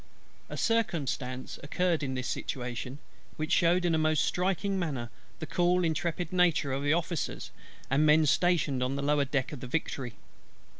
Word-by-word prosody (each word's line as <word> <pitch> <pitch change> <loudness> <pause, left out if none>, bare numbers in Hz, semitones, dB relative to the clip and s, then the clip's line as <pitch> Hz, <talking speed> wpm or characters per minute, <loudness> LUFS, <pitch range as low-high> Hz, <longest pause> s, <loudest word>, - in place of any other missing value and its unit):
A - - -5
circumstance 140 - -1
occurred 170 +3 0
in 135 -2 -2
this 130 0 -3
situation, 125 +1 -4 0.4
which 155 0 -3
shewed 175 +1 +3
in 170 - +2
a 160 - +2
most 155 -1 +2
striking 190 +2 0
manner 135 -9 -3 0.3
the - - -5
cool 180 +2 +2
intrepidity 170 -1 +1
of 135 - -1
the 145 0 +1
Officers 170 0 -2 0.4
and 140 +3 +2
men 155 +1 +5
stationed 150 -4 +2
on 130 +2 0
the 140 - -2
lower 145 0 +2
deck 135 -1 -1
of 150 - -6
the 125 - -7
Victory. 130 -4 -3
155 Hz, 160 wpm, -29 LUFS, 135-175 Hz, 0.4 s, men